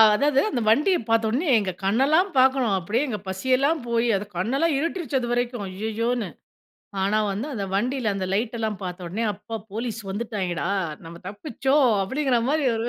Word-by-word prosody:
அதாது 280 +2 +3
அந்த 245 - -1
வண்டிய 300 - +4
பார்த்த 225 -1 +2
உடனே 290 +9 0
எங்க 195 -3 -2
கண்ணெல்லாம் 275 - +3
பார்க்கணும். 255 -5 +4
அப்டியே 205 +7 0
எங்க 225 -5 -2
பசியெல்லாம் 260 - +1
போய் 235 0 +1
அது 195 +1 -2
கண்ணெல்லாம் 270 - +1
இருட்டிருச்சு 320 -2 -1
அது 240 -1 -3
வரைக்கும் 240 -2 -1
"ஐயயோ"ன்னு. 220 +4 -2 0.7
ஆனா 205 +3 +2
வந்து 205 +7 -3
அந்த 200 - -2
வண்டில 240 +1 0
அந்த 190 -1 -2
லைட்டல்லாம் 220 -1 -2
பார்த்த 180 0 -5
உடனே 215 +7 -2
"அப்பா 225 +3 -7 0.2
போலீஸ் 225 0 -3
வந்துட்டாங்கேடா 195 -5 -2 0.4
நம்ம 170 +1 -9
தப்பிச்சோம்" 265 +5 +1 0.2
அப்டிங்கிற 265 +2 +1
மாரி 300 -3 +1
ஒரு 225 +1 -2
230 Hz, 160 wpm, -24 LUFS, 205-265 Hz, 0.7 s, வண்டிய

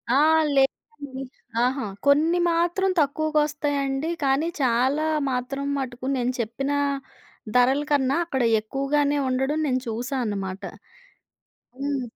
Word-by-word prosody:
ఆ! - - +5 0.4
లేదండి. 270 0 -1 0.4
అహా! 260 -1 0 0.2
కొన్ని 320 +5 +4
మాత్రం 345 +3 +1
తక్కువకొస్తాయండి. 295 -1 0
కానీ 275 +4 +2
చాలా 260 +5 +2 0.3
మాత్రం 265 +3 -3
మటుకు 255 -1 -5
నేను 250 +1 0
చెప్పిన 240 +5 -2 0.8
ధరల 260 +3 +4
కన్నా 275 -1 +2
అక్కడ 265 -6 -1 0.2
ఎక్కువగానే 285 +5 0
ఉండడం 265 +4 0
నేను 255 -1 +1
చూశా 245 +5 -3
అనమాట. 195 -2 -4 1.2
హ్మ్. 280 -1 -1
275 Hz, 105 wpm, -24 LUFS, 255-290 Hz, 1.2 s, ఆ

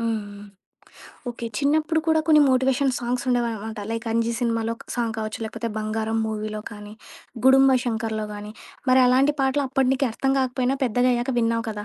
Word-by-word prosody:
హ్మ్. 230 -1 0
హ్మ్. 205 0 -11 0.9
ఓకే. 235 0 -6
చిన్నప్పుడు 310 +3 +1
కూడా 320 -1 +3
కొన్ని 305 -1 +6
మోటివేషన్ 260 +1 +2
సాంగ్స్ 245 +2 -2
ఉండేవానమాట. 225 -3 -1
లైక్ 230 0 -4
'అంజీ' 230 0 0
సినిమాలో 230 -1 0
ఒక - - -15
సాంగ్ 230 -2 -1
కావచ్చు 215 0 -4
లేకపోతే 230 +1 -4
'బంగారం' 220 +1 -1
మూవీలో 215 0 -4
కానీ, 210 0 -10 0.5
'గుడుంబ 265 0 +6
శంకర్‌లో' 220 -2 -2
గానీ, 210 +1 -8 0.4
మరి 260 - +6
అలాంటి 270 +4 +3
పాటలు 270 +2 +1
అప్పడు 270 -1 +1
నీకీ 270 0 +1
అర్థం 270 +3 0
గాకపోయినా 260 +1 0
పెద్దగాయ్యాక 245 +2 +1
విన్నావు 230 0 0
కదా! 210 -1 -6
235 Hz, 160 wpm, -23 LUFS, 220-265 Hz, 0.9 s, కొన్ని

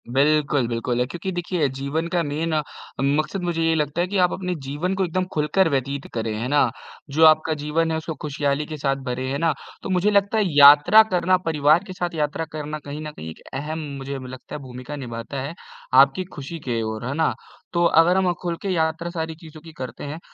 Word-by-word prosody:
बिल्कुल, 140 0 +2
बिल्कुल 120 +1 -2
है, 125 - +2
क्योंकि 175 +6 -5
देखिए 175 -3 -1
जीवन 140 +5 -3
का 175 - +3
मेन 155 +2 -2 0.5
मक़सद 150 +7 0
मुझे 170 -2 -1
ये 165 0 +3
लगता 150 +1 0
है 180 - 0
कि 200 +2 -2
आप 180 -1 +4
अपने 180 -1 -3
जीवन 150 +7 -2
को 190 0 +1
एकदम 185 +2 -1
ख़ुलकर 155 +4 +2
व्यतीत 140 0 -2
करें, 115 -1 -2
हैं 115 +3 -3
ना? 145 -3 +4 0.4
जो 155 +3 +4
आपका 155 0 +5
जीवन 155 +2 -1
है, 160 - 0
उसको 160 0 -4
ख़ुशहाली 145 0 -1
के 155 0 -6
साथ 140 -1 0
भरे 130 +1 -2
हैं 140 - -2
ना, 165 -1 +2 0.3
तो - - -5
मुझे 185 +3 +2
लगता 200 +2 +2
है 215 - +3
यात्रा 145 +9 +9
करना 185 0 +3
परिवार 155 +2 +3
के 185 - -6
साथ 175 -2 -3
यात्रा 150 +1 -1
करना 150 0 -5
कहीं 145 +1 -6
न 155 0 -6
कहीं 80 - -8
एक 80 - -11
अहम 150 +4 -4 0.2
मुझे 135 +1 -5
लगता 130 0 -9
है 150 - -6
भूमिका 125 +2 -8
निभाता 125 0 -6
है 140 +5 -5 0.4
आपकी 135 +7 +5
ख़ुशी 145 +4 -6
के 120 -5 -2
ओर, 110 +1 -4
हैं 130 - -2
ना? 160 +1 +2 0.4
तो 170 0 +2
अगर 170 +2 +5
हम 185 -2 +3
ख़ुल 175 -2 -2
के 200 - -3
यात्रा 165 -1 0
सारी 160 -2 -4
चीज़ों 155 -1 -13
की 165 +1 -12
करते 130 -5 -7
हैं, 145 +3 -5
150 Hz, 220 wpm, -23 LUFS, 140-170 Hz, 0.5 s, यात्रा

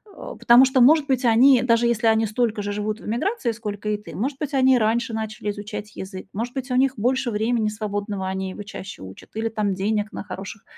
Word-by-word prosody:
Э, - - -8
потому 240 +3 +7
что, 260 -1 +2
может 295 +3 +5
быть, 260 -1 0
они, 245 +3 +6
даже 235 -1 +3
если 235 -1 +1
они 220 0 +3
столько 220 -1 -1
же 205 0 -3
живут 210 +2 -3
в - - -12
эмиграции, 240 - -1
сколько 210 -2 -5
и 210 - 0
ты, 210 - -11
может 265 +7 -2
быть, 300 -2 -4
они 260 -1 +4
раньше 230 +2 0
начали 215 -1 -4
изучать 205 +1 -7
язык, 190 0 -8
может 235 +4 -4
быть, 260 -1 -4
у - - +1
них 265 0 +3
больше 250 +2 0
времени 220 +1 0
свободного, 205 -2 -4
они 190 0 -3
его 205 - -8
чаще 200 - -9
учат, 95 0 -12
или 225 +1 -1
там 210 -3 -1
денег 210 +2 -1
на - - -5
хороших 195 +1 -8
220 Hz, 225 wpm, -23 LUFS, 205-245 Hz, -, потому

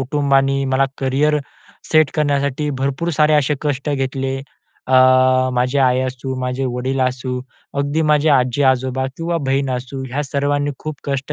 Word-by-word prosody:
कुटुंबाने 135 0 +1
मला 135 +1 +3
career 140 +3 +1 0.5
set 155 -2 +5
करण्यासाठी 145 -1 0
भरपूर 140 +5 -1
सारे 155 -1 +2
असे 150 0 +2
कष्ट 145 -1 -2
घेतले. 135 -1 -2 0.5
अ, 130 - -3 0.6
माझी 125 +3 +1
आई 130 -1 +3
असू, 130 0 -4
माझे 125 +1 -2
वडील 130 +2 -2
असू, 125 0 -1 0.4
अगदी 145 +3 0
माझे 150 0 +3
आजी-आजोबा 130 -1 +2
किंवा 170 +1 -2
बहीण 135 0 +1
असू 130 +2 -4
ह्या 145 +3 -1
सर्वांनी 145 +1 -1
खूप 155 0 -5
कष्ट 140 +1 -3
135 Hz, 145 wpm, -19 LUFS, 130-145 Hz, 0.6 s, set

